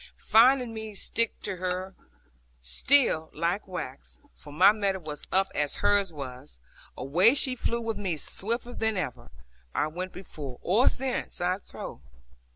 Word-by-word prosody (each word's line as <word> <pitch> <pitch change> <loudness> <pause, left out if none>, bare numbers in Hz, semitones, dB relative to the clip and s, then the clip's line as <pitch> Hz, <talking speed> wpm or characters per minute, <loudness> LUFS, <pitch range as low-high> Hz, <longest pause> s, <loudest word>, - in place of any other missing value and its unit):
Finding 245 +1 +4
me 220 -1 -7
stick 230 +3 0
to 195 -3 -3
her 185 +1 -3 0.7
still 160 - +2
like 175 +5 -1
wax, 140 -8 -7 0.2
for 145 - -9
my 180 +7 +7
mettle 200 -4 -1
was 150 -1 -6
up 190 +1 +4
as 145 -1 0
hers 205 -2 +2
was, 135 - -8 0.4
away 175 - +4
she 260 -2 +3
flew 235 -1 -1
with 225 -1 -3
me 185 -6 -2
swifter 235 +9 -3
than 220 -3 -1
ever 125 -9 -4 0.5
I - - +2
went 180 +4 -5
before, 145 -8 -8
or 215 +9 +4
since, 260 -1 -3
I 180 +2 0
trow. - - -9
190 Hz, 150 wpm, -28 LUFS, 155-220 Hz, 0.7 s, my